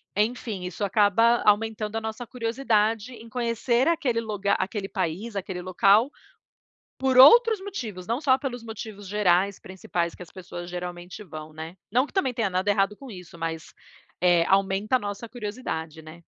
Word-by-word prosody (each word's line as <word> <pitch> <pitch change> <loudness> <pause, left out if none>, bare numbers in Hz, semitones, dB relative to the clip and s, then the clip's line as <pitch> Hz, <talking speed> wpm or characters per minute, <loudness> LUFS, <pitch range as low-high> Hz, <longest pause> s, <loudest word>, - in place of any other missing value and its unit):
enfim, 215 -2 -1
isso 180 +3 -3
acaba 220 +4 +3
aumentando 215 +1 +1
a - - -2
nossa 220 +2 -5
curiosidade 230 -1 0
em 230 -1 -12
conhecer 235 +2 0
aquele 280 -9 0
luga 205 -3 -1
aquele 195 +1 -2
país, 190 +4 -3
aquele 190 -2 -4
local, 195 +6 +4 0.9
por 265 -1 +1
outros 450 - +8
motivos, 225 - -6
não 235 +4 -1
só 260 -3 +4
pelos 245 -4 -5
motivos 220 -3 -8
gerais, 200 -1 +2
principais 175 -2 -4
que - - -11
as 175 - -12
pessoas 175 -2 -8
geralmente 180 +2 -7
vão, 155 -3 -9
né. 160 +3 -8 0.2
Não 250 +4 +3
que - - -19
também 275 -10 +1
tenha 230 -4 0
nada 185 +2 0
errado 200 0 +2
com 270 +1 -11
isso, 180 -4 -11
mas, 165 -1 -5 0.5
eh, 175 -2 +4
aumenta 195 +4 +2
a - - +1
nossa 205 0 -5
curiosidade, 205 -9 -6
né. 160 +2 -13
210 Hz, 165 wpm, -25 LUFS, 185-235 Hz, 0.9 s, outros